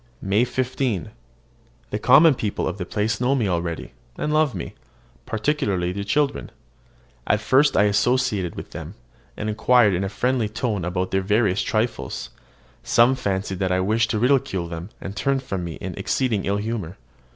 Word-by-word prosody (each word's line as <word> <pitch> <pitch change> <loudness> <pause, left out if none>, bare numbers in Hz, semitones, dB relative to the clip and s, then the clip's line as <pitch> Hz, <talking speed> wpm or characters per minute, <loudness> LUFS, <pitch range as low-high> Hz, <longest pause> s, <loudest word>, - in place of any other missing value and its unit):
MAY 100 +5 +2
15. 125 - -2 0.8
The 105 - -2
common 140 +8 +7
people 105 -5 -2
of 90 - -4
the 90 - -4
place 105 +1 -1
know 130 +3 +2
me 120 -6 +1
already, 85 -5 -3 0.2
and 150 - -1
love 155 -4 +2
me, - - -6 0.5
particularly 105 -7 0
the 100 +2 -4
children. 140 +7 0 0.8
When - - +4
at - - -3
first 130 +7 +3
I - - +6
associated 105 -3 +1
with - - -8
them, - - -8 0.4
and 105 - -3
inquired 110 0 +4
in 90 +2 0
a 95 - -2
friendly 125 0 0
tone 110 -4 -2
about 90 +1 -2
their 95 - +1
various 105 0 +2
trifles, 110 +2 -2 0.5
some 120 +2 +4
fancied 95 -6 -2
that 95 -2 0
I 90 - +2
wished 110 +4 +1
to 110 - 0
ridicule 125 -7 +1
them, 85 +3 -7
and 95 +1 -7
turned 135 +3 0
from 95 -8 -4
me 85 -1 -5
in - - -6
exceeding 115 -7 -1
ill 100 +1 0
humour. 105 -4 -4
105 Hz, 175 wpm, -23 LUFS, 95-125 Hz, 0.8 s, common